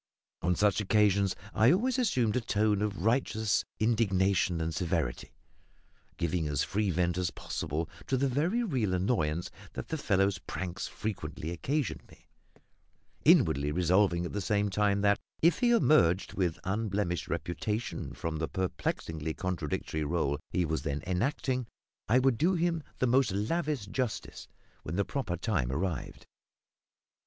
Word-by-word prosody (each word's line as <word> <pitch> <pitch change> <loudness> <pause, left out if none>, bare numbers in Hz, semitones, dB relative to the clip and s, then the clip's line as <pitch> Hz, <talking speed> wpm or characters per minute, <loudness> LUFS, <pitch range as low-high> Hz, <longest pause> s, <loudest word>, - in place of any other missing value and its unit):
On 90 +1 +1
such 105 +2 +2
occasions 100 -2 +3 0.2
I 110 +3 +5
always 250 +8 +2
assumed 125 - +1
a 125 - +1
tone 105 -2 +1
of 100 -3 -2
righteous 110 -3 +1
indignation 100 -5 +2
and 80 0 -2
severity, 80 -5 -2 0.8
giving 85 -1 0
as 75 -1 0
free 105 0 0
vent 90 0 +1
as 90 -2 0
possible 80 0 -3 0.2
to 130 - +1
the 140 +2 +2
very 165 - +1
real 125 - 0
annoyance 90 -5 0 0.2
that - - -6
the 160 - -2
fellow's 95 -4 +2
pranks 90 0 -5
frequently 100 -6 -5
occasioned 135 - -2
me; - - -20 1.0
inwardly 70 +1 +5
resolving 90 +1 +2
at - - -5
the 105 - -2
same 100 +1 +1
time 100 0 +2
that, 100 0 +3 0.2
if 170 0 +4
he 245 - +3
emerged 100 - +4
with 90 -4 0
unblemished 95 -3 -1
reputation 105 +6 -3
from 80 -1 -4
the 80 0 -1
perplexingly 80 -4 -3
contradictory 80 -3 -2
role 75 -2 0
he 90 - 0
was 80 -3 -1
then 75 -1 -3
enacting, 125 +6 -1 0.4
I 120 - +5
would 130 -3 +3
do 180 +4 +3
him 170 -1 0 0.2
the - - +1
most 125 -2 +3
lavish 140 - -1
justice 105 -1 -4 0.3
when 80 - -5
the 100 +1 +1
proper 130 -11 -3
time 85 - 0
arrived. 80 +1 -3
100 Hz, 145 wpm, -30 LUFS, 85-120 Hz, 1.0 s, I